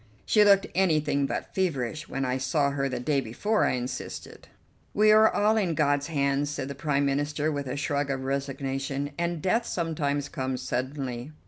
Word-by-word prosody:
"She 210 Hz, -, +5 dB
looked 200 Hz, -1 st, +5 dB
anything 155 Hz, -6 st, +2 dB
but -, -, -4 dB
feverish 155 Hz, -4 st, -2 dB
when 135 Hz, 0 st, -2 dB
I 130 Hz, +1 st, -1 dB
saw 140 Hz, +1 st, +1 dB
her 135 Hz, -1 st, -1 dB
the 130 Hz, -, -3 dB
day 140 Hz, +2 st, +1 dB
before," 205 Hz, -, 0 dB
I -, -, +1 dB
insisted. 125 Hz, 0 st, -6 dB, 0.5 s
"We 215 Hz, +1 st, +5 dB
are 215 Hz, +1 st, +6 dB
all 215 Hz, +2 st, +2 dB
in 180 Hz, -6 st, +1 dB
God's 145 Hz, -1 st, +1 dB
hands," 140 Hz, -2 st, 0 dB
said 140 Hz, -2 st, -4 dB
the -, -, -4 dB
Prime 140 Hz, 0 st, 0 dB
Minister 145 Hz, +2 st, 0 dB
with 140 Hz, -2 st, -3 dB
a 130 Hz, +2 st, -3 dB
shrug 145 Hz, 0 st, -1 dB
of 135 Hz, -1 st, -2 dB
resignation, 135 Hz, +1 st, -3 dB
"and 170 Hz, -2 st, -2 dB
death 230 Hz, +5 st, +1 dB
sometimes 145 Hz, -4 st, -1 dB
comes 130 Hz, -4 st, -3 dB
suddenly." 130 Hz, 0 st, -4 dB
145 Hz, 180 wpm, -27 LUFS, 135-160 Hz, 0.5 s, are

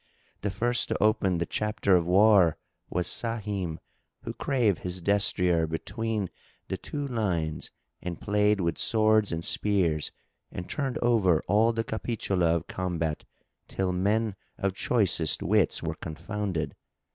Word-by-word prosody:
The 105 Hz, -, -1 dB
first 120 Hz, +5 st, 0 dB
to -, -, 0 dB
open 105 Hz, -4 st, +2 dB
the 85 Hz, -, -1 dB
chapter[FN#6] 105 Hz, -2 st, +1 dB
of 85 Hz, -, -3 dB
war 95 Hz, -3 st, +5 dB, 0.3 s
was 90 Hz, 0 st, -1 dB
Sahim, 105 Hz, -8 st, -2 dB, 0.5 s
who -, -, -5 dB
drave 120 Hz, -9 st, +1 dB
his 90 Hz, 0 st, -4 dB
destrier 90 Hz, -3 st, +2 dB
between 105 Hz, +5 st, -3 dB, 0.4 s
the -, -, -2 dB
two 145 Hz, -1 st, -5 dB
lines 90 Hz, -, -2 dB, 0.3 s
and 90 Hz, -2 st, -5 dB
played 105 Hz, -1 st, +2 dB
with 85 Hz, -1 st, -1 dB
swords 110 Hz, -1 st, +3 dB
and 80 Hz, 0 st, -2 dB
spears 90 Hz, -7 st, +1 dB, 0.4 s
and 90 Hz, -, -6 dB
turned 135 Hz, -4 st, -2 dB
over 100 Hz, -9 st, +3 dB
all 110 Hz, +3 st, +4 dB
the 115 Hz, -1 st, -1 dB
Capitula 100 Hz, -7 st, 0 dB
of 85 Hz, -, -3 dB
combat 85 Hz, -4 st, -3 dB, 0.4 s
till 95 Hz, -1 st, -1 dB
men 105 Hz, +3 st, +1 dB, 0.2 s
of 100 Hz, -1 st, -1 dB
choicest 95 Hz, -7 st, +1 dB
wits 100 Hz, -1 st, +2 dB
were -, -, -2 dB
confounded. 85 Hz, +1 st, -4 dB
100 Hz, 135 wpm, -27 LUFS, 85-110 Hz, 0.5 s, war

